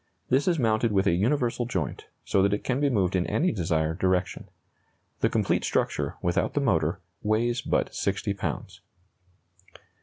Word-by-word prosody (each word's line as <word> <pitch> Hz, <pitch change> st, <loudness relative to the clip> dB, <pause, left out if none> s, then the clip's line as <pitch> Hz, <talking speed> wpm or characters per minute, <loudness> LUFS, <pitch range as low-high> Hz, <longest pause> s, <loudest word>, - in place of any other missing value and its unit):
This 135 Hz, +5 st, +2 dB
is 175 Hz, -2 st, +3 dB
mounted 115 Hz, -3 st, +2 dB
with 100 Hz, -1 st, +2 dB
a 100 Hz, -, +4 dB
universal 120 Hz, +4 st, +1 dB
joint, 90 Hz, -9 st, -3 dB, 0.2 s
so 95 Hz, -, +2 dB
that 100 Hz, +1 st, +3 dB
it -, -, -7 dB
can 130 Hz, +1 st, 0 dB
be 145 Hz, -1 st, +2 dB
moved 95 Hz, -7 st, +1 dB
in 90 Hz, -1 st, +1 dB
any 180 Hz, +4 st, +1 dB
desired 80 Hz, -, -1 dB
direction. 95 Hz, -2 st, 0 dB, 0.7 s
The -, -, +2 dB
complete -, -, +1 dB
structure, -, -, -1 dB
without 85 Hz, 0 st, 0 dB
the -, -, +3 dB
motor, 90 Hz, -, +1 dB, 0.2 s
weighs 115 Hz, +3 st, +1 dB
but -, -, 0 dB
60 100 Hz, +1 st, -1 dB
pounds. 100 Hz, -, -5 dB
105 Hz, 160 wpm, -27 LUFS, 90-120 Hz, 0.7 s, a